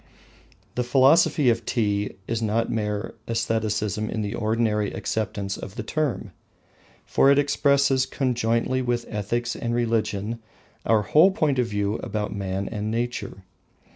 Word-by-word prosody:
The 125 Hz, -, -1 dB
Philosophy 135 Hz, +1 st, +4 dB
of 115 Hz, 0 st, -2 dB
Tea 105 Hz, -3 st, 0 dB
is 115 Hz, 0 st, -2 dB
not 110 Hz, +1 st, 0 dB
mere 105 Hz, -1 st, -2 dB
aestheticism 110 Hz, -2 st, -1 dB
in 110 Hz, -, -2 dB
the 100 Hz, -, -3 dB
ordinary 110 Hz, -2 st, 0 dB
acceptance 100 Hz, -2 st, -3 dB
of 95 Hz, -, -8 dB
the -, -, -4 dB
term, 125 Hz, -, -2 dB, 0.7 s
for 135 Hz, -, +4 dB
it 140 Hz, -, +5 dB
expresses 140 Hz, -2 st, +3 dB
conjointly 125 Hz, -1 st, 0 dB
with 120 Hz, -1 st, -1 dB
ethics 120 Hz, +3 st, -2 dB
and 120 Hz, 0 st, -2 dB
religion 115 Hz, -2 st, -1 dB, 0.5 s
our 110 Hz, -2 st, +4 dB
whole 155 Hz, -, +5 dB
point 150 Hz, -8 st, 0 dB
of 125 Hz, -, +2 dB
view 105 Hz, -1 st, -1 dB
about 105 Hz, 0 st, -3 dB
man 95 Hz, 0 st, -3 dB
and 105 Hz, 0 st, -3 dB
nature. 115 Hz, -4 st, -3 dB
115 Hz, 140 wpm, -24 LUFS, 105-125 Hz, 0.7 s, it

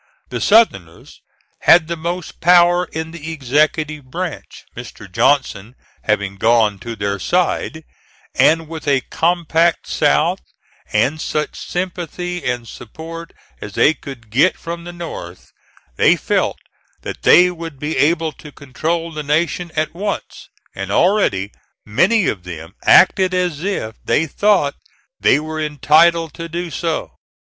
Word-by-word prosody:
The -, -, -4 dB
Southerners 100 Hz, -, +2 dB, 0.4 s
had 170 Hz, -2 st, +5 dB
the 170 Hz, -, -2 dB
most 170 Hz, +2 st, -5 dB
power 175 Hz, +1 st, +5 dB
in 160 Hz, -1 st, -6 dB
the 165 Hz, -1 st, -7 dB
executive 150 Hz, +1 st, 0 dB
branch, 170 Hz, +5 st, -6 dB
Mr. -, -, -9 dB
Johnson 125 Hz, -5 st, 0 dB, 0.3 s
having 100 Hz, -2 st, -1 dB
gone 110 Hz, -2 st, +2 dB
to 120 Hz, -1 st, -6 dB
their 100 Hz, -1 st, -2 dB
side; 170 Hz, -, -1 dB, 0.5 s
and 165 Hz, 0 st, +3 dB
with 160 Hz, -1 st, -8 dB
a 135 Hz, -2 st, +3 dB
compact 170 Hz, 0 st, +1 dB
South, -, -, +1 dB, 0.5 s
and 155 Hz, +4 st, +1 dB
such 150 Hz, -1 st, -2 dB
sympathy 180 Hz, 0 st, -4 dB
and 125 Hz, -2 st, -2 dB
support 165 Hz, +10 st, -9 dB, 0.3 s
as 105 Hz, -, -8 dB
they 150 Hz, -, +4 dB
could 120 Hz, -8 st, -11 dB
get 140 Hz, +11 st, +3 dB
from 170 Hz, 0 st, -7 dB
the 175 Hz, -, -7 dB
North, 165 Hz, -, -9 dB, 0.5 s
they -, -, +5 dB
felt -, -, -1 dB, 0.5 s
that -, -, -6 dB
they 180 Hz, +1 st, +6 dB
would 165 Hz, -4 st, -8 dB
be 150 Hz, +3 st, -3 dB
able 160 Hz, +4 st, +2 dB
to 150 Hz, +1 st, -13 dB
control 165 Hz, +5 st, -3 dB
the 155 Hz, -1 st, -5 dB
nation 165 Hz, +4 st, -1 dB
at 155 Hz, 0 st, -1 dB
once, 200 Hz, +3 st, -5 dB, 0.2 s
and 95 Hz, 0 st, -6 dB
already 105 Hz, -, +2 dB, 0.3 s
many 185 Hz, -, +2 dB
of 95 Hz, -4 st, -2 dB
them 85 Hz, -1 st, -9 dB
acted 185 Hz, 0 st, +5 dB
as 175 Hz, -4 st, -1 dB
if 150 Hz, -, -3 dB
they 160 Hz, -, +1 dB
thought 185 Hz, -3 st, +2 dB, 0.5 s
they -, -, +4 dB
were 155 Hz, +1 st, -5 dB
entitled 155 Hz, +2 st, +3 dB
to 165 Hz, -1 st, -7 dB
do 170 Hz, +1 st, -4 dB
so. 165 Hz, +2 st, -3 dB
160 Hz, 135 wpm, -18 LUFS, 130-170 Hz, 0.5 s, they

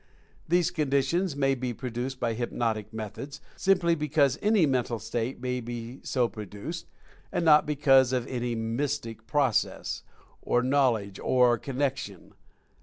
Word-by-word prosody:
These 175 Hz, 0 st, +3 dB
conditions 150 Hz, +2 st, +1 dB
may 135 Hz, -1 st, +2 dB
be 125 Hz, -2 st, -3 dB
produced 125 Hz, +2 st, -4 dB
by 115 Hz, -1 st, 0 dB
hypnotic 110 Hz, -2 st, -2 dB
methods, 110 Hz, +6 st, -7 dB, 0.2 s
simply 185 Hz, -3 st, +3 dB
be 150 Hz, -2 st, -2 dB
cause 140 Hz, -4 st, +3 dB
any 210 Hz, -5 st, +4 dB
mental 125 Hz, -4 st, 0 dB
state 115 Hz, +3 st, -3 dB
may 125 Hz, 0 st, -2 dB
be 120 Hz, +2 st, -6 dB
so 125 Hz, -3 st, +1 dB
produced, 105 Hz, -, -7 dB, 0.4 s
and 170 Hz, -, -1 dB
not 150 Hz, -2 st, +6 dB
because 135 Hz, -3 st, +4 dB
of 125 Hz, -2 st, 0 dB
any 120 Hz, -2 st, -2 dB
mystic 115 Hz, 0 st, -3 dB
process, 140 Hz, -7 st, 0 dB, 0.4 s
or 120 Hz, -, +1 dB
knowledge, 125 Hz, -8 st, +1 dB
or 125 Hz, -2 st, +4 dB
con 135 Hz, +2 st, -6 dB
nection. 130 Hz, -8 st, -3 dB
130 Hz, 140 wpm, -28 LUFS, 115-145 Hz, 0.4 s, not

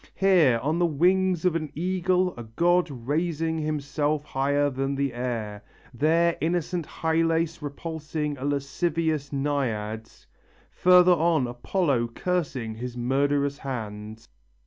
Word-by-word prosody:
Here 175 Hz, -11 st, +4 dB
on 155 Hz, +4 st, 0 dB
the 175 Hz, -, +3 dB
wings 180 Hz, +3 st, +2 dB
of 180 Hz, -3 st, +3 dB
an 155 Hz, -3 st, -3 dB
eagle 180 Hz, +2 st, +1 dB
a 120 Hz, -, -7 dB
god 170 Hz, +10 st, +1 dB
raising 160 Hz, +5 st, -2 dB
himself 150 Hz, 0 st, -1 dB
higher 145 Hz, +1 st, +1 dB
than 135 Hz, +1 st, -2 dB
the 140 Hz, -1 st, -1 dB
air; 115 Hz, -4 st, -4 dB, 0.3 s
there 165 Hz, +6 st, +2 dB
innocent 170 Hz, 0 st, -1 dB
Hylas 165 Hz, 0 st, 0 dB
repulsing 150 Hz, 0 st, -4 dB
a -, -, -6 dB
lascivious 145 Hz, +2 st, -1 dB
Naiad; 115 Hz, -7 st, -2 dB, 0.6 s
further 180 Hz, 0 st, +6 dB
on 165 Hz, -4 st, +2 dB
Apollo 125 Hz, +1 st, 0 dB
cursing 140 Hz, -11 st, -2 dB
his 125 Hz, +2 st, -6 dB
murderous 140 Hz, +3 st, 0 dB
hand...." 110 Hz, -4 st, -6 dB
150 Hz, 120 wpm, -26 LUFS, 130-170 Hz, 0.6 s, further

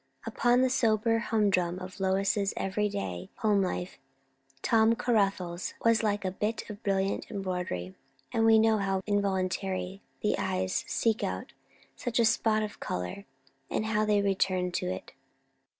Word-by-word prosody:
Upon 240 Hz, +2 st, +2 dB
the 260 Hz, -, +3 dB
sober 225 Hz, -3 st, +2 dB
humdrum 195 Hz, -6 st, +1 dB
of 185 Hz, +1 st, -8 dB
Lois's 195 Hz, +1 st, +1 dB
every 205 Hz, +2 st, 0 dB
day 90 Hz, -, -4 dB
home 210 Hz, -3 st, +2 dB
life, 180 Hz, -1 st, -3 dB, 0.6 s
Tom 225 Hz, 0 st, +4 dB
Caruthers 195 Hz, -7 st, 0 dB
was 230 Hz, -1 st, +5 dB
like 205 Hz, -2 st, 0 dB
a 185 Hz, -, 0 dB
bit 210 Hz, +4 st, -2 dB
of 210 Hz, +1 st, -10 dB
brilliant 195 Hz, 0 st, 0 dB
embroidery; 180 Hz, -, -3 dB, 0.4 s
and 225 Hz, -, +1 dB
we 225 Hz, 0 st, +7 dB
know 220 Hz, -1 st, +4 dB
how 195 Hz, -1 st, 0 dB
involuntarily 190 Hz, -1 st, -1 dB, 0.2 s
the 210 Hz, -, +1 dB
eyes 185 Hz, 0 st, -1 dB
seek 225 Hz, -2 st, +1 dB
out -, -, -4 dB, 0.4 s
such 245 Hz, -1 st, -3 dB
a 235 Hz, -, +5 dB
spot 220 Hz, -1 st, +2 dB
of 210 Hz, -, -6 dB
colour, 90 Hz, -, -4 dB, 0.4 s
and 215 Hz, -, -1 dB
how 215 Hz, -1 st, +1 dB
they 210 Hz, -1 st, +2 dB
return 185 Hz, -2 st, +1 dB
to 175 Hz, -, -2 dB
it. 95 Hz, 0 st, -5 dB
200 Hz, 150 wpm, -29 LUFS, 185-220 Hz, 0.6 s, we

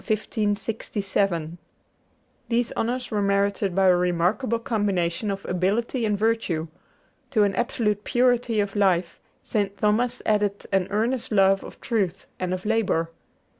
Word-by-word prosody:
[Illustration: 215 Hz, -1 st, 0 dB
THOMAS -, -, -9 dB, 0.5 s
AQUINAS] 170 Hz, -4 st, 0 dB, 0.9 s
These 235 Hz, 0 st, +1 dB
honors 245 Hz, +2 st, -2 dB
were 210 Hz, -1 st, 0 dB
merited 200 Hz, -1 st, +1 dB
by 195 Hz, 0 st, +3 dB
a 180 Hz, -1 st, +6 dB
remarkable 180 Hz, +7 st, +1 dB
combination 205 Hz, -5 st, -1 dB
of 195 Hz, 0 st, -4 dB
ability 210 Hz, +7 st, 0 dB
and 210 Hz, -1 st, 0 dB
virtue. 200 Hz, -7 st, 0 dB, 0.6 s
To 220 Hz, -6 st, +3 dB
an 200 Hz, -1 st, +2 dB
absolute 210 Hz, -3 st, 0 dB
purity 245 Hz, -2 st, +2 dB
of 200 Hz, 0 st, -1 dB
life, 180 Hz, -4 st, +1 dB, 0.2 s
St. 200 Hz, -2 st, -1 dB
Thomas 235 Hz, +4 st, +1 dB
added 205 Hz, -1 st, +1 dB
an 190 Hz, -2 st, +2 dB
earnest 230 Hz, +5 st, -1 dB
love 195 Hz, -1 st, +4 dB
of -, -, -11 dB
truth 195 Hz, -6 st, -1 dB
and 185 Hz, -1 st, -2 dB
of 185 Hz, +1 st, -3 dB
labor. 205 Hz, -7 st, +1 dB
205 Hz, 140 wpm, -25 LUFS, 190-225 Hz, 0.9 s, a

